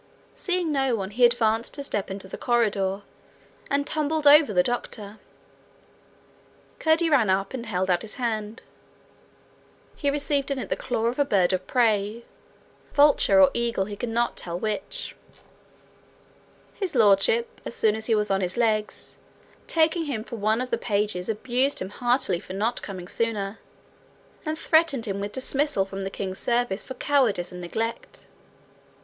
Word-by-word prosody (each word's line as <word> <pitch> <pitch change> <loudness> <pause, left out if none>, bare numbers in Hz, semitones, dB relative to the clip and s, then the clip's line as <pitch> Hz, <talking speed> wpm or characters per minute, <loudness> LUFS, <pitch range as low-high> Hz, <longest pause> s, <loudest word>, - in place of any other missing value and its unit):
Seeing 360 -3 -1
no 270 -4 +1
one, 195 -2 -4
he 245 +4 0
advanced 230 -1 +1
to 280 - -5
step 205 -7 -3
into 195 0 -6
the - - -7
corridor, 205 -5 0 0.7
and 285 0 +1
tumbled 310 +1 -1
over 290 -3 +7
the 180 -3 +3
doctor. 220 -3 -4 1.6
Curdie 320 +1 +2
ran 245 -9 +4
up, 195 +3 0
and 240 -3 -5
held 190 -3 -1
out 175 -1 +2
his 220 - -7
hand. 225 -3 -3 1.3
He 285 - 0
received 285 -1 0
in 275 - -1
it 255 - -5
the - - +1
claw 230 -3 -2
of 240 +4 -1
a - - +5
bird 190 -8 +2
of 185 0 -2
prey 220 -2 +1 0.7
vulture 290 0 +5
or 280 -1 +7
eagle, 235 -5 0
he 205 +1 -6
could 235 +3 -4
not 235 +1 0
tell 170 -1 -4
which. 215 +6 -4 1.6
His 375 -7 -3
Lordship, 220 +1 +3
as - - -6
soon 215 -1 +2
as 220 0 -4
he 225 - +3
was 210 -1 0
on 195 0 +1
his 180 +2 -3
legs, 215 -3 -1 0.5
taking 325 +1 +2
him 245 -7 -3
for 235 - -8
one 215 +3 +1
of 255 - -5
the - - 0
pages 205 -4 -1
abused 250 +5 0
him 185 - -4
heartily 240 -5 0
for 185 - -9
not 215 +5 -1
coming 185 -3 -7
sooner, 215 -2 -2 0.9
and 310 0 -1
threatened 315 -7 +2
him 200 -2 -3
with 205 +1 -4
dismissal 265 -5 +1
from 195 0 -7
the 195 - -3
king's 190 -1 -5
service 235 -5 0
for 260 - -8
cowardice 245 - +1
and 180 0 -8
neglect. 230 - -5
225 Hz, 165 wpm, -25 LUFS, 200-270 Hz, 1.6 s, over